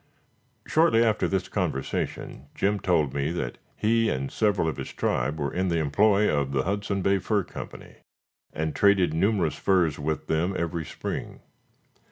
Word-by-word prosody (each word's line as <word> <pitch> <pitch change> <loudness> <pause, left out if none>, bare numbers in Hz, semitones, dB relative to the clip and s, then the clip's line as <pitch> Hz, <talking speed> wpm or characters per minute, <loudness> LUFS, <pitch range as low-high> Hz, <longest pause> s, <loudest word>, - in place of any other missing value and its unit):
Shortly 155 -8 +4
after 110 -2 +2
this 95 -1 -1
conversation, 80 -6 -3
Jim 100 +1 +1
told 80 -8 +1
me 70 +2 -1
that 75 -9 -4 0.2
he 115 +1 +2
and 65 +1 -2
several 100 -6 +1
of 80 - -2
his - - -6
tribe 70 +6 -1
were 70 -1 -2
in 95 +1 0
the 85 -2 +1
employ 100 +7 +3
of 70 -2 0
the 65 -1 +1
Hudson 100 0 -2
Bay 100 +1 +3
Fur 105 +1 0
Company, - - -10 0.5
and 80 0 -3
traded 100 -5 +4
numerous 95 -1 +1
furs 85 -7 +2
with 75 +1 -2
them 85 +4 0
every 85 -1 -2
spring. - - -6
90 Hz, 160 wpm, -26 LUFS, 75-100 Hz, 0.5 s, Shortly